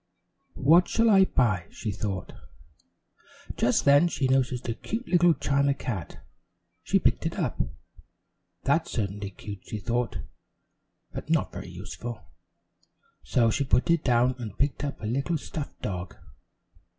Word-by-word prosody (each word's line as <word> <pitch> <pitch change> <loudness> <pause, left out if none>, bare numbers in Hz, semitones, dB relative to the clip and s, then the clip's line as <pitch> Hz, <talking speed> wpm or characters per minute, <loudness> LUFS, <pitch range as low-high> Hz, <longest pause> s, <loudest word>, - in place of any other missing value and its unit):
"What 170 +6 +5
shall 225 0 +3
I 195 -1 +7
buy?" 105 - +1
she 110 - -4
thought. 100 -2 -4 1.2
Just - - +2
then 145 +4 +6
she 140 -5 0
noticed 130 -2 +1
a 115 - 0
cute 225 - -5
little 175 -2 +4
china 140 +1 +1
cat. 95 - -5 0.6
She - - +2
picked - - +1
it - - -5
up. - - -1 1.0
"That's - - +2
certainly 100 -1 -3
cute," 100 0 -9
she 110 - -4
thought, 120 +3 -1 1.0
"but - - -7
not - - +1
very - - -7
useful," 120 -1 -7 1.0
so 115 +10 +2
she 140 - 0
put 135 +3 +2
it 170 -2 +2
down 125 0 +3
and 110 -5 -6
picked 140 0 0
up 145 - -3
a - - -5
little 140 +9 0
stuffed 150 0 -7
dog. 90 -3 -4
125 Hz, 140 wpm, -27 LUFS, 105-145 Hz, 1.2 s, I